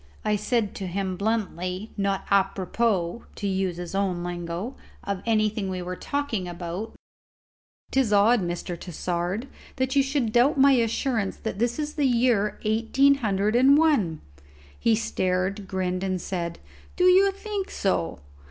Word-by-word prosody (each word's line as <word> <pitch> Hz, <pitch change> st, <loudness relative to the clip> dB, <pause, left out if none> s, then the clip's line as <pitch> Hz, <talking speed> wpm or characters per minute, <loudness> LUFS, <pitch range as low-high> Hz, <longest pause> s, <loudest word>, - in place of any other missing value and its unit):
I 210 Hz, -, +2 dB
said 210 Hz, 0 st, 0 dB
to 190 Hz, -, -4 dB
him 190 Hz, +1 st, -2 dB
bluntly 200 Hz, -1 st, -2 dB
not 195 Hz, -1 st, -1 dB
apropos 195 Hz, 0 st, +1 dB
(to 205 Hz, -, -5 dB
use 190 Hz, -2 st, -1 dB
his 175 Hz, 0 st, -6 dB
own 190 Hz, -3 st, 0 dB
lingo) 175 Hz, +6 st, -4 dB, 0.3 s
of 200 Hz, -2 st, -3 dB
anything 215 Hz, -2 st, +1 dB
we 185 Hz, -1 st, -3 dB
were 180 Hz, +1 st, -4 dB
talking 280 Hz, -7 st, -2 dB
about, 175 Hz, +5 st, -5 dB, 1.0 s
"'Tis 260 Hz, -5 st, +2 dB
odd, 210 Hz, +3 st, +5 dB
Mr. 175 Hz, 0 st, -3 dB
Tassard, 180 Hz, -, -3 dB, 0.5 s
you 280 Hz, -, +5 dB
should 270 Hz, -4 st, 0 dB
doubt 245 Hz, +6 st, +4 dB
my 275 Hz, +1 st, +6 dB
assurance 230 Hz, -3 st, +1 dB
that 220 Hz, -3 st, -5 dB
this 240 Hz, +1 st, 0 dB
is 300 Hz, 0 st, -3 dB
the 290 Hz, -3 st, +2 dB
year 235 Hz, -4 st, +2 dB
eighteen 230 Hz, +6 st, +3 dB
hundred 210 Hz, 0 st, +1 dB
and 270 Hz, +4 st, +6 dB
one." 255 Hz, -, +2 dB, 0.6 s
He 230 Hz, -, +3 dB
stared, 190 Hz, -2 st, -1 dB
grinned, 185 Hz, -1 st, -2 dB
and 185 Hz, -1 st, -1 dB
said, 170 Hz, -2 st, -4 dB, 0.4 s
"Do 360 Hz, -, +1 dB
you 380 Hz, +2 st, +6 dB
think 395 Hz, 0 st, -4 dB
so?" 85 Hz, -, -1 dB
205 Hz, 145 wpm, -25 LUFS, 185-240 Hz, 1.0 s, my